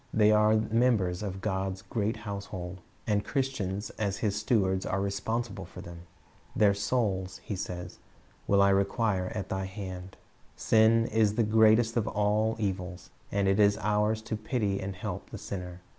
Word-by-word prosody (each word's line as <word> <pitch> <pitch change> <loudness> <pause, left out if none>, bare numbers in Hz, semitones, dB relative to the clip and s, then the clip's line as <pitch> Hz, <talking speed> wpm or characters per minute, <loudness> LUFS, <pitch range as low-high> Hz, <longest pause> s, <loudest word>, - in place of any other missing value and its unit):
They 105 -1 +4
are 105 0 +5
members 110 -5 +2
of 95 -2 -4
God's 95 -2 -2
great 110 -1 -2
household, 100 -3 -6 0.2
and 105 -2 +1
Christians 115 -8 -2
as 100 -2 -1
His 105 -3 -1
stewards 100 -3 +1
are 95 - -1
responsible 100 +1 -2
for 90 - -10
them. 85 0 -11 0.5
"Their 105 -4 +5
souls," 100 -3 -1
He 105 - -4
says, 90 -1 -6 0.5
"will 100 0 +5
I 100 - +5
require 100 0 +1
at 100 - -4
thine 95 0 -2
hand." 95 -1 -7 0.4
Sin 115 +1 +4
is 110 -2 +2
the 115 - +3
greatest 110 +2 +4
of 110 -2 +1
all 105 +2 +1
evils, 95 -4 -4 0.2
and 100 -1 +1
it 95 +2 +2
is 100 -1 +5
ours 105 +1 +1
to 110 - -3
pity 105 -2 -1
and 95 0 -4
help 90 - -6
the - - -7
sinner. 90 -2 -6
100 Hz, 160 wpm, -29 LUFS, 95-110 Hz, 0.5 s, are